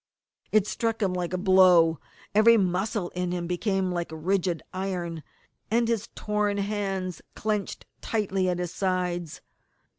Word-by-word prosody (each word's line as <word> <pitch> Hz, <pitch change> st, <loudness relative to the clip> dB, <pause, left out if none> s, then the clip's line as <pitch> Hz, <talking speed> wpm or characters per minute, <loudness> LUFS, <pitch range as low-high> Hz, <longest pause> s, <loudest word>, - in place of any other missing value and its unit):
It 215 Hz, -2 st, +4 dB
struck 225 Hz, +1 st, -1 dB
him 190 Hz, -2 st, +1 dB
like 180 Hz, -1 st, -2 dB
a 185 Hz, -, -1 dB
blow. 180 Hz, -4 st, +5 dB, 0.3 s
Every 225 Hz, +2 st, +6 dB
muscle 190 Hz, 0 st, 0 dB
in 180 Hz, 0 st, -3 dB
him 175 Hz, -1 st, -2 dB
became 185 Hz, +1 st, 0 dB
like 175 Hz, -1 st, -2 dB
rigid 175 Hz, +1 st, -1 dB
iron, 180 Hz, -3 st, -3 dB, 0.5 s
and 230 Hz, +1 st, +2 dB
his 230 Hz, -2 st, -1 dB
torn 210 Hz, -1 st, 0 dB
hands 195 Hz, -3 st, -2 dB
clenched 210 Hz, -2 st, -2 dB, 0.2 s
tightly 195 Hz, -4 st, 0 dB
at 180 Hz, -, 0 dB
his 175 Hz, -1 st, -4 dB
sides. 180 Hz, -3 st, -2 dB
185 Hz, 140 wpm, -27 LUFS, 180-205 Hz, 0.5 s, Every